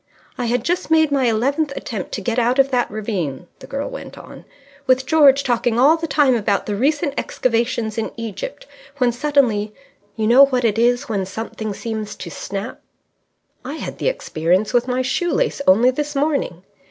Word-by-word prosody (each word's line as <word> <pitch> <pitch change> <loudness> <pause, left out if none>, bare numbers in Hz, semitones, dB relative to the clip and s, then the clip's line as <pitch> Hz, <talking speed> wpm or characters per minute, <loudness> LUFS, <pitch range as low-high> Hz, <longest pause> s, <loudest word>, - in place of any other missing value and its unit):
"I 245 - -3
had 245 +2 0
just 350 -1 -1
made 315 -2 +4
my 275 -2 +2
eleventh 275 +6 0
attempt 210 -6 -5
to - - -3
get 235 +4 -1
out 245 +2 +1
of 275 0 +3
that 250 -1 +1
ravine," 190 - -4
the - - -12
girl 275 +1 -4
went - - -9
on, - - -12 0.4
"with 260 0 +3
George 280 -2 +5
talking 240 -1 0
all 280 +6 +6
the 330 0 -4
time 280 -2 +3
about 210 -4 0
the 210 - -2
recent 285 +5 0
excavations 230 -2 -1
in 225 - -3
Egypt, 230 - -6 0.3
when 250 -3 +2
suddenly 235 -6 +1 0.4
you 220 - -1
know 255 +5 +7
what 250 -3 0
it 225 -1 +1
is 245 +3 +2
when 205 -4 -1
something 215 0 -5
seems 220 -2 -5
to - - -8
snap 200 +4 -6 0.4
" - - -50 0.3
"I 265 +3 -6
had - - -7
the - - -1
experience 185 - -1
with 245 0 +2
my 255 0 0
shoe 345 +7 -1
lace - - 0
only 230 +7 +5
this 295 +2 -4
morning." 275 - -1
245 Hz, 190 wpm, -20 LUFS, 220-280 Hz, 0.4 s, know